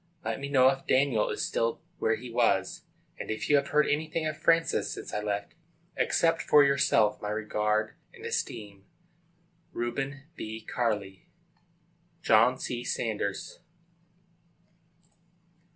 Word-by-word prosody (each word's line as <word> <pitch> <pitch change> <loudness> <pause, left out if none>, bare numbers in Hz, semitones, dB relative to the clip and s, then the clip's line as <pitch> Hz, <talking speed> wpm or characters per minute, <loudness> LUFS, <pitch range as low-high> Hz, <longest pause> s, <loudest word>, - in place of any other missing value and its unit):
Let 110 +1 -2
me 140 0 -5
know 130 -2 +5
if 135 0 -3
Daniel 130 -5 +2
is - - -2
still 115 0 -1 0.2
where 110 - +2
he 120 +1 -9
was, - - +1 0.3
and - - -6
if 110 +6 -2
you - - +7
have 140 0 0
heard 150 0 +3
anything 155 +2 -1
of 155 0 -2
Francis 165 +1 +2
since - - -7
I 105 - -1
left 105 -1 -3 0.4
you. - - +2
Accept 165 0 +2
for 150 -1 +6
yourself 140 -6 +3
my 105 - -3
regard 105 0 -1 0.2
and - - -12
esteem. 100 -3 -4 0.9
REUBEN 135 +4 -3
B. 110 +1 -6
CARLLEY. 105 -6 -2 1.0
JOHN 115 +4 +5
C. 120 -2 -4
SAUNDERS. 105 -5 -3
120 Hz, 135 wpm, -28 LUFS, 105-140 Hz, 1.0 s, you